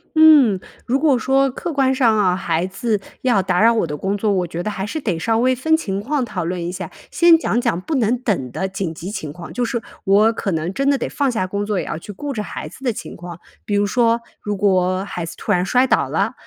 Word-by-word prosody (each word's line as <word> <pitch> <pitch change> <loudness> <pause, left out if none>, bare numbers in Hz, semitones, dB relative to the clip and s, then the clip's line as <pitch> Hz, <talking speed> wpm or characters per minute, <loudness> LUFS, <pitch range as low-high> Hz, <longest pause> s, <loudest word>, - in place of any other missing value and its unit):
嗯， 295 -11 +7 0.3
如 260 +3 +1
果 290 -4 +3
说 270 +3 +2
客 330 +6 -5
观 265 -2 +2
上 235 -4 +3
啊， 185 -3 +3
孩 170 -1 -1
子 210 +2 -2 0.2
要 245 -7 +3
打 180 -1 0
扰 230 +1 +6
我 220 -7 0
的 150 -1 -4
工 195 +6 -1
作， 205 +1 0
我 185 -3 +1
觉 170 +1 -5
得 210 - -2
还 195 -2 -4
是 310 +9 -4
得 190 -10 -1
稍 225 +7 0
微 255 +2 +3
分 315 +6 +2
情 195 -12 -2
况 270 +6 -1
讨 185 -7 -4
论 175 0 -3
一 175 - -3
下， 180 -2 -6 0.2
先 340 -1 +6
讲 240 -7 0
讲 235 -8 0
不 310 +11 -3
能 240 -2 +2
等 180 - -2
的 190 - -2
紧 190 -3 -4
急 165 +3 -7
情 155 -8 -5
况， 170 0 -9
就 245 - -1
是 235 0 -2 0.2
我 205 +3 +4
可 205 -3 -3
能 160 +1 -2
真 275 +8 -1
的 280 -1 +3
得 - - -3
放 280 -3 0
下 200 -6 -1
工 200 +2 -2
作， 205 -2 -1
也 - - -3
要 150 - -4
去 165 - -9
顾 285 +9 -5
着 215 -6 -3
孩 - - -6
子 - - -14
的 245 -3 +1
情 - - -8
况。 175 -1 -9 0.3
比 205 - -3
如 205 0 +2
说 230 +2 +2 0.2
如 205 0 -3
果 185 -2 +1
孩 175 -4 -5
子 165 - -7
突 - - -4
然 180 -2 +2
摔 250 +6 +3
倒 - - +2
了， - - 0
210 Hz, 280 characters per minute, -20 LUFS, 185-255 Hz, 0.3 s, 嗯